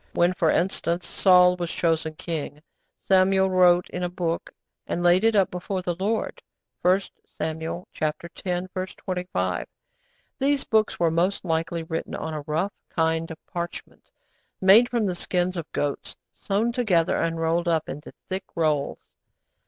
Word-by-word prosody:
When, 175 +1 +3
for 165 -3 +1
instance, 170 -1 0
Saul 180 -1 +5
was 175 -1 -3
chosen 160 -2 0
king, 150 -2 -5 0.3
Samuel 190 0 +3
'wrote 180 -1 +5
in 180 - -4
a 180 - -1
book 170 -2 -2 0.4
and 175 - -2
laid 175 +3 +5
it 225 -1 +4
up 195 -2 +3
before 180 +1 -3
the 175 - -1
Lord.' 205 +6 -2 0.4
(1 185 +2 +4 0.2
Samuel 160 +3 -5
x. 155 -1 +1 0.8
25.) 180 - -2 0.7
These 275 +1 +2
books 220 -1 +1
were 170 -2 +3
most 180 +5 0
likely 165 0 -1
written 160 0 -4
on 160 0 -4
a 155 - -3
rough 160 +7 -1 0.2
kind 160 0 0
of 160 - -7
parchment, 170 0 -7 0.5
made 210 +6 +7
from 235 -3 0
the 185 - 0
skins 180 +1 -1
of 165 -3 -6
goats, 145 -1 -3
sewn 215 +4 -1
together, 210 -10 +2
and 165 0 -1
rolled 165 +1 +1
up 165 -2 +1
into 150 +2 -7 0.2
thick 190 0 -3
rolls. 155 -4 +1
175 Hz, 150 wpm, -25 LUFS, 165-190 Hz, 0.8 s, made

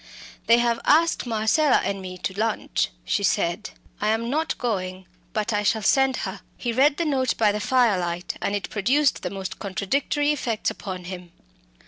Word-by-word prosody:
"They 230 - +7
have 235 -1 +1
asked 325 -3 +3
Marcella 230 +6 +3
and 195 0 -2
me 185 -1 -7
to 190 - -3
lunch," 215 - -1 0.2
she - - 0
said. 175 +6 0 0.3
"I 210 - +1
am 225 +2 0
not 315 +3 -1
going, 185 -6 -3 0.3
but 215 +1 -1
I 205 - +1
shall 215 +1 +1
send 270 +3 +3
her." - - -6 0.2
He 240 - -2
read 275 +5 +3
the 340 - 0
note 265 -5 0
by 215 -2 +4
the 210 - -2
firelight, 190 -7 +1
and 200 - 0
it 200 - -4
produced 260 +7 +2
the - - -3
most 190 -1 -6
contradictory 280 +9 0
effects 235 -7 -1
upon 185 -4 -7
him. 180 -1 -8
220 Hz, 175 wpm, -24 LUFS, 195-260 Hz, 0.3 s, They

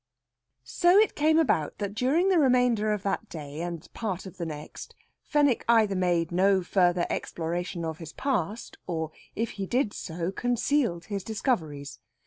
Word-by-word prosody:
So 350 - +4
it 430 +1 +5
came 315 +2 +3
about 215 - +1
that 200 -1 -3
during 275 - +2
the 365 -3 +4
remainder 250 -6 +3
of 210 -2 -2
that 200 +2 -2
day 150 -1 -7
and 170 -2 -5
part 200 -5 -3
of 190 - -10
the 170 -2 -3
next 150 -1 -8 0.3
Fenwick 285 -5 +2
either 220 -4 +4
made 175 -2 +1
no 190 +1 +3
further 175 -1 +2
exploration 170 +1 -3
of 160 -1 -4
his 165 -2 -8
past; 225 - -2
or, 160 -3 -2 0.2
if 225 +1 -1
he 195 - -2
did 245 -2 +1
so, 170 +1 -4
concealed 245 -3 0
his 200 -3 -4
discoveries. 160 - -2
195 Hz, 160 wpm, -27 LUFS, 170-245 Hz, 0.3 s, it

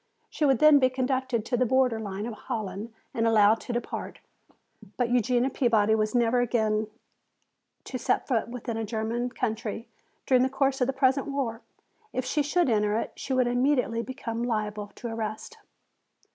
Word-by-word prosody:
She 305 - 0
would 270 -3 +4
then 305 +2 +7
be 255 -1 +4
conducted 255 -3 -1
to 245 - -1
the 250 - +2
border 255 -2 +2
line 205 -1 -4
of 235 - -4
Holland 215 -1 -5 0.2
and 230 0 +1
allowed 220 0 +5
to - - -6
depart. 240 - -4 0.8
But 245 -1 0
Eugenia 245 +2 +2
Peabody 220 -4 +2
was 215 +1 0
never 240 0 +3
again 220 -3 +1 1.0
to 255 - -5
set - - 0
foot 235 -5 0
within 235 -1 -5
a 225 - -2
German 225 +3 -2
country 225 -1 -3 0.4
during 255 -2 +4
the 260 - +2
course 270 0 0
of 250 - +3
the - - +1
present 265 +1 +2
war. 260 -5 -2 0.5
If 255 - -2
she 295 +4 +1
should 335 +4 +1
enter 210 -2 +2
it - - -3
she - - -7
would 255 -1 +3
immediately 245 -1 +1
become 235 -2 -5
liable 215 -3 -2
to 240 - -6
arrest. 220 -2 -5
240 Hz, 175 wpm, -27 LUFS, 220-260 Hz, 1.0 s, then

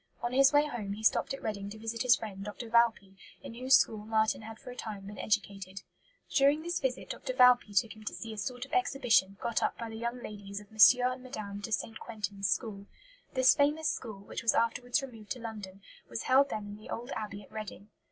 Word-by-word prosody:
On 240 +1 -1
his 270 +1 +6
way 290 0 +5
home 220 -9 -4
he 215 +2 -8
stopped - - +3
at 270 - -5
Reading 200 -2 -3
to 215 - -9
visit 225 +1 -4
his 250 -1 +6
friend 200 -3 -7
Dr. 210 +3 -7
Valpy, 225 -5 +2 0.3
in - - -8
whose 255 +3 +4
school 220 -4 +3
Marten 220 +1 +1
had 220 0 -9
for 255 0 -10
a - - -9
time 205 -5 -6
been 205 +1 -9
educated. 195 -3 -2 0.5
During 285 +2 +4
this 345 +1 -1
visit 260 -2 -2
Dr. 255 - -4
Valpy 250 -4 +6
took 220 +3 -6
him 215 - -14
to - - -3
see 225 -1 -6
"a - - -9
sort 245 +5 -4
of - - -18
exhibition" 235 - +2
got 235 -1 -1
up - - 0
by 230 -1 -5
the 225 - -8
"young 235 +2 -4
ladies" 200 -1 -7
of 205 -1 -15
M. 245 +3 +7
and 255 0 -2
Mme. 200 -1 -6
de 215 - -6
St. 220 +1 -2
Quentin's 200 -3 -3
school. 200 -4 -2 0.5
This 260 0 +6
famous 300 +1 +2
school, 210 -4 -7
which 200 - -6
was 230 - +3
afterwards 245 +4 +1
removed 225 -5 -10
to 255 - -11
London, 205 -4 -8 0.3
was 230 - -4
held 275 +2 +4
then 210 -5 -4
in 205 0 -8
the 215 - -13
old 240 +4 -5
Abbey 205 -1 -5
at - - -19
Reading. 215 -1 -8
225 Hz, 230 wpm, -31 LUFS, 205-250 Hz, 0.5 s, M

